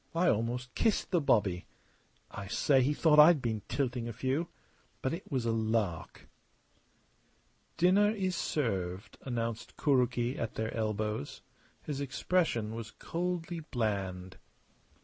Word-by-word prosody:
I 175 Hz, +1 st, +3 dB
almost 120 Hz, +3 st, -1 dB
kissed 220 Hz, -4 st, +1 dB
the 175 Hz, -3 st, +3 dB
bobby. 100 Hz, -10 st, +2 dB, 0.6 s
I 100 Hz, -, -7 dB
say, 135 Hz, +6 st, +3 dB
he 130 Hz, +3 st, +2 dB
thought 150 Hz, 0 st, +4 dB
I'd 155 Hz, +1 st, +8 dB
been 110 Hz, -4 st, -2 dB
tilting 125 Hz, -4 st, -1 dB
a 120 Hz, -, -5 dB
few. 130 Hz, +8 st, -1 dB, 0.6 s
But 130 Hz, -, 0 dB
it 170 Hz, 0 st, -7 dB
was 130 Hz, -4 st, 0 dB
a 115 Hz, -, +2 dB
lark!" 110 Hz, -6 st, -1 dB, 1.5 s
"Dinner 195 Hz, +4 st, +5 dB
is 190 Hz, -4 st, -1 dB
served," 95 Hz, -, -2 dB
announced 115 Hz, -3 st, -4 dB
Kuroki 125 Hz, -3 st, +1 dB
at 115 Hz, -, -3 dB
their 110 Hz, 0 st, -2 dB
elbows. 110 Hz, -6 st, -2 dB, 0.4 s
His 145 Hz, -2 st, -4 dB
expression 130 Hz, -5 st, 0 dB
was 115 Hz, -1 st, -6 dB
coldly 175 Hz, +2 st, -3 dB
bland. 100 Hz, -, -3 dB
125 Hz, 130 wpm, -31 LUFS, 110-150 Hz, 1.5 s, I'd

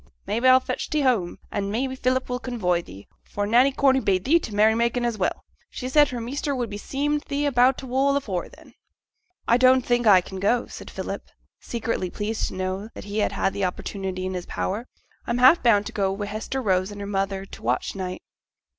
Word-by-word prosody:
Maybe, 230 Hz, +6 st, +1 dB
a'll 255 Hz, 0 st, +8 dB
fetch -, -, -4 dB
thee 305 Hz, -, +1 dB
home, 230 Hz, -10 st, +1 dB
an' 200 Hz, -1 st, -2 dB
maybe 260 Hz, +5 st, -2 dB
Philip 255 Hz, 0 st, 0 dB
will 250 Hz, 0 st, -3 dB
convoy 190 Hz, -10 st, -1 dB
thee, 100 Hz, -, -13 dB, 0.2 s
for 205 Hz, -, -3 dB
Nanny 245 Hz, +6 st, +4 dB
Corney 265 Hz, -1 st, +3 dB
bade 190 Hz, -6 st, 0 dB
thee 325 Hz, +6 st, +5 dB
to 320 Hz, -, -7 dB
t' 210 Hz, -, -7 dB
merry 215 Hz, +1 st, +5 dB
making, 235 Hz, +1 st, 0 dB
as 230 Hz, -3 st, -2 dB
well. 185 Hz, -, -1 dB, 0.3 s
She 255 Hz, -, -6 dB
said 295 Hz, +1 st, +5 dB
her 245 Hz, -, -4 dB
measter 275 Hz, +4 st, -3 dB
would 240 Hz, -4 st, -3 dB
be 205 Hz, -, -4 dB
seem' 290 Hz, +5 st, -1 dB
thee 290 Hz, 0 st, -1 dB
about 255 Hz, -1 st, +4 dB
t' -, -, -7 dB
wool 270 Hz, +2 st, +1 dB
afore 195 Hz, -10 st, -3 dB
then.' -, -, -17 dB, 0.7 s
'I 235 Hz, -, +5 dB
don't 255 Hz, 0 st, +5 dB
think 240 Hz, -1 st, +1 dB
as -, -, +8 dB
I 185 Hz, -2 st, +7 dB
can 190 Hz, +1 st, -8 dB
go,' 235 Hz, +5 st, +2 dB
said -, -, -10 dB
Philip, -, -, -6 dB, 0.3 s
secretly 230 Hz, -5 st, -3 dB
pleased 215 Hz, +4 st, -2 dB
to -, -, -7 dB
know 185 Hz, +3 st, -3 dB
that -, -, -8 dB
he 205 Hz, +1 st, -3 dB
had 195 Hz, -, 0 dB
the 200 Hz, -, -3 dB
opportunity 185 Hz, 0 st, -4 dB
in 185 Hz, -, -3 dB
his 180 Hz, -1 st, -5 dB
power; 215 Hz, +6 st, -3 dB, 0.4 s
'I'm 235 Hz, -, 0 dB
half 260 Hz, +7 st, +6 dB
bound 210 Hz, -4 st, +4 dB
to -, -, -5 dB
go 195 Hz, -2 st, 0 dB
Wi' 200 Hz, +1 st, -3 dB
Hester 220 Hz, +6 st, -4 dB
Rose 185 Hz, -2 st, +1 dB
and 205 Hz, -1 st, -9 dB
her 200 Hz, -, -5 dB
mother 195 Hz, -1 st, -2 dB
to -, -, -11 dB
t' -, -, -18 dB
watch 120 Hz, +2 st, -1 dB
night.' 185 Hz, -1 st, -5 dB
225 Hz, 225 wpm, -24 LUFS, 195-255 Hz, 0.7 s, a'll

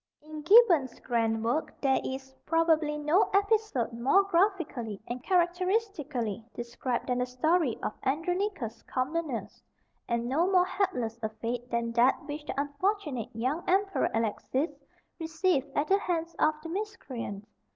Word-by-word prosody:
In 310 Hz, 0 st, -8 dB
Gibbon's 340 Hz, -, +5 dB
grand 225 Hz, -2 st, 0 dB
work 250 Hz, +7 st, -1 dB
there 270 Hz, -2 st, +2 dB
is, 265 Hz, 0 st, -6 dB
probably, 320 Hz, -2 st, +2 dB
no 305 Hz, +7 st, +3 dB
episode 400 Hz, -, +1 dB
more 260 Hz, +12 st, +4 dB
graphically 340 Hz, -, 0 dB
and 245 Hz, +1 st, -5 dB
characteristically 350 Hz, -, 0 dB
described 240 Hz, +1 st, -3 dB
than 250 Hz, -1 st, 0 dB
the 250 Hz, -, 0 dB
story 285 Hz, +1 st, +1 dB
of -, -, -1 dB
Andronicus 330 Hz, -, -1 dB
Comnenus; 270 Hz, -1 st, -3 dB, 0.5 s
and 235 Hz, 0 st, -1 dB
no 330 Hz, +9 st, +2 dB
more 365 Hz, -1 st, +5 dB
hapless 255 Hz, -, -1 dB
a 220 Hz, -, -1 dB
fate 235 Hz, +3 st, -5 dB
than 235 Hz, 0 st, -1 dB
that 240 Hz, +5 st, +3 dB
which 295 Hz, 0 st, -5 dB
the -, -, -3 dB
unfortunate 290 Hz, -, -1 dB
young 260 Hz, +9 st, -1 dB
Emperor 390 Hz, +1 st, +2 dB
Alexis 230 Hz, +7 st, -1 dB, 0.5 s
received 320 Hz, -3 st, 0 dB
at 290 Hz, -, +2 dB
the 390 Hz, +1 st, +4 dB
hands 335 Hz, -3 st, -2 dB
of 310 Hz, 0 st, +3 dB
the 330 Hz, -, -6 dB
miscreant. 270 Hz, -, -5 dB
295 Hz, 140 wpm, -29 LUFS, 240-355 Hz, 0.5 s, Gibbon's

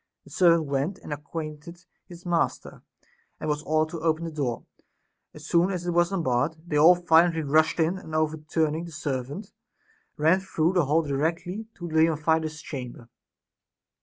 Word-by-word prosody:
The -, -, -17 dB
servant 170 Hz, -3 st, +4 dB
went 140 Hz, +7 st, -2 dB
and 150 Hz, -, -7 dB
acquainted 155 Hz, +3 st, -8 dB, 0.2 s
his 175 Hz, 0 st, -13 dB
master, 175 Hz, -1 st, -1 dB, 0.6 s
and -, -, -5 dB
was 150 Hz, -1 st, -1 dB
ordered 155 Hz, 0 st, 0 dB
to 170 Hz, -, -5 dB
open 160 Hz, 0 st, 0 dB
the 165 Hz, -, -5 dB
door; 135 Hz, -6 st, -3 dB, 0.7 s
as 150 Hz, 0 st, -11 dB
soon 170 Hz, +3 st, +3 dB
as 180 Hz, -3 st, -3 dB
it 175 Hz, -, 0 dB
was 175 Hz, +1 st, +2 dB
unbarred, 155 Hz, -4 st, 0 dB
they 155 Hz, -, -4 dB
all 160 Hz, +5 st, +7 dB
violently 165 Hz, -1 st, +3 dB
rushed 155 Hz, +4 st, +2 dB
in, 170 Hz, +4 st, +1 dB
and 160 Hz, -4 st, -8 dB
overturn 155 Hz, 0 st, 0 dB
ing 165 Hz, +2 st, -4 dB
the 170 Hz, -, -10 dB
servant 145 Hz, -, -5 dB, 0.6 s
ran 160 Hz, +5 st, +4 dB
through 175 Hz, -2 st, 0 dB
the 175 Hz, -5 st, +2 dB
hall 155 Hz, +4 st, +2 dB
directly 165 Hz, +8 st, -2 dB
to 175 Hz, -, -7 dB
Leontidas's 160 Hz, -1 st, +1 dB
chamber. 125 Hz, -4 st, -8 dB
160 Hz, 165 wpm, -26 LUFS, 150-170 Hz, 0.7 s, all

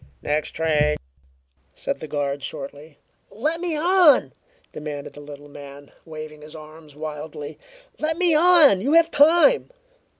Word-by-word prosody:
"Next 150 Hz, +1 st, -1 dB
train," 150 Hz, -2 st, 0 dB, 0.8 s
said -, -, -4 dB
the 155 Hz, -, -8 dB
guard 140 Hz, -1 st, -3 dB
shortly. 145 Hz, +1 st, -8 dB, 0.3 s
"Let 310 Hz, +10 st, -3 dB
me 345 Hz, -3 st, -2 dB
on!" 345 Hz, -2 st, +4 dB, 0.4 s
demanded 150 Hz, -2 st, -7 dB
the -, -, -12 dB
little 145 Hz, 0 st, -12 dB
man, 145 Hz, 0 st, -13 dB
waving 155 Hz, -1 st, -10 dB
his 150 Hz, +1 st, -11 dB
arms 155 Hz, -1 st, -13 dB
wildly. 150 Hz, -1 st, -8 dB, 0.4 s
"Let 315 Hz, +1 st, -1 dB
me 350 Hz, -2 st, +2 dB
on! 310 Hz, -, +5 dB
You 280 Hz, +7 st, 0 dB
have 335 Hz, 0 st, +4 dB
time!" 340 Hz, +13 st, +4 dB
155 Hz, 135 wpm, -22 LUFS, -, 0.8 s, on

